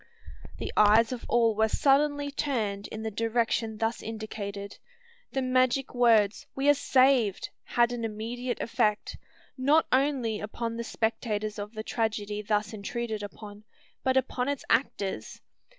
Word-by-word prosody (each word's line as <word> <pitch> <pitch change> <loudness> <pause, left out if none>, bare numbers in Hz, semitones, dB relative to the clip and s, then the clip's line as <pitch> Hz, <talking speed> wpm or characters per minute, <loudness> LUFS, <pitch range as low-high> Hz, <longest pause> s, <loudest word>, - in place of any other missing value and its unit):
The - - -5
eyes 215 +3 +5
of 250 - -5
all 230 -2 +4
were 220 +1 +2
suddenly 285 +3 +2
turned 215 -9 -2
in 220 0 -7
the 220 - -3
direction 225 0 0
thus 225 +1 -1
indicated. 205 -2 -6 0.5
The 270 - -1
magic 255 +1 +1
words, 225 -4 +3
"We 270 +1 0
are - - +8
saved!" 260 -6 +3 0.2
had 240 0 +2
an 240 -1 -4
immediate 230 +3 -4
effect, 225 -3 0 0.4
not 290 +5 +4
only 255 -5 +1
upon 230 +2 -4
the 235 - -3
spectators 220 -2 -2
of 210 +2 -7
the 215 - -4
tragedy 210 -2 -2
thus 210 +1 -1
intruded 220 +1 -4
upon, 205 0 -9 0.4
but 260 0 +2
upon 260 0 0
its 285 -2 -3
actors. 225 -5 -1
230 Hz, 140 wpm, -28 LUFS, 215-255 Hz, 0.5 s, are